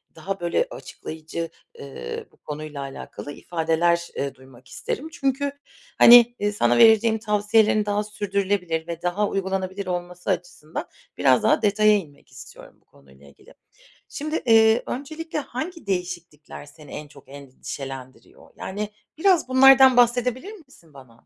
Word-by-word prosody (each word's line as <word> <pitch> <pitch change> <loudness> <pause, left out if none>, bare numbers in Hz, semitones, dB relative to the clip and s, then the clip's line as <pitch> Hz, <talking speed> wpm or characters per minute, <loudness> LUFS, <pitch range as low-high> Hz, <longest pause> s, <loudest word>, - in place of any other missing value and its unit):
daha, 195 -1 -5
böyle, 175 - 0
açıklayıcı, 160 - -7 0.3
eee, 135 - -7
bu - - -27
konuyla 150 -1 -7
alakalı 135 +1 -8
ifadeler, 170 +2 0
eee, 140 -1 -3
duymak 130 -1 -18
isterim. 290 - -5
Çünkü, 275 0 -1 0.5
hani, 240 0 +8
eee, 205 0 0
sana 120 -12 +1
vereceğim 220 0 +5
tavsiyelerin 210 0 +2
daha 205 0 0
sürdürülebilir 195 -5 -2
ve 170 0 -6
daha 180 +4 0
uygulanabilir 190 0 -3
olması 180 +1 -5
açısından 175 -3 -4 0.3
biraz 130 -2 +3
daha - - +3
detaya 215 +1 +3
inmek 150 -8 -11
istiyorum - - -14
bu - - -38
konuyla 70 +1 -21
ilgili. 70 - -19 0.6
Şimdi, 305 +2 -4
iii, 225 -1 +5
öncelikle 310 +4 -5
hangi 310 - -7
değişiklikler 175 -6 -5
seni 145 -1 -16
en 150 - -7
çok 140 -1 -17
endişelendiriyor? 135 -1 -10
Yani, 205 +2 -5 0.3
biraz 360 -2 +3
bunlardan 265 0 +7
bahsedebilir 245 - +2
misin 270 - -18
bana? 125 -4 -17
190 Hz, 135 wpm, -23 LUFS, 150-230 Hz, 0.6 s, hani